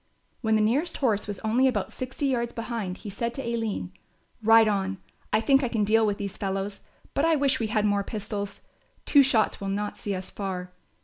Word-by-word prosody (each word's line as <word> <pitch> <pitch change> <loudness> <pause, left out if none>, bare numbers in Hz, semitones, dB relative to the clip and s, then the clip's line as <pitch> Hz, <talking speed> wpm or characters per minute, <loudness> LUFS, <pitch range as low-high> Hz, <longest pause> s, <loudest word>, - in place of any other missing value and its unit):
When 220 -2 +2
the 215 - +3
nearest 285 +10 +1
horse 220 -7 +1
was 205 -2 -4
only 235 +4 +3
about 255 - -1
sixty 255 +3 -3
yards 240 -3 0
behind 225 -5 -4
he - - -3
said 235 +4 -3
to 270 - -4
Aline, 225 -6 -2 0.5
"Ride 225 0 +6
on, 195 -2 0 0.3
I - - +4
think 270 +3 +4
I - - +2
can 220 -2 0
deal 220 +1 +4
with 205 -1 0
these 200 -2 -5
fellows, 195 0 -3 0.3
but 280 - +1
I 325 0 +4
wish 275 -2 +2
we 225 - 0
had 215 -1 +1
more 205 -1 +2
pistols, 205 -1 -5 0.4
two 285 - +7
shots 240 -7 +2
will 195 - -2
not 205 +1 -2
see 200 -2 -3
us 185 0 -6
far. 185 -2 -4
215 Hz, 205 wpm, -27 LUFS, 200-240 Hz, 0.5 s, two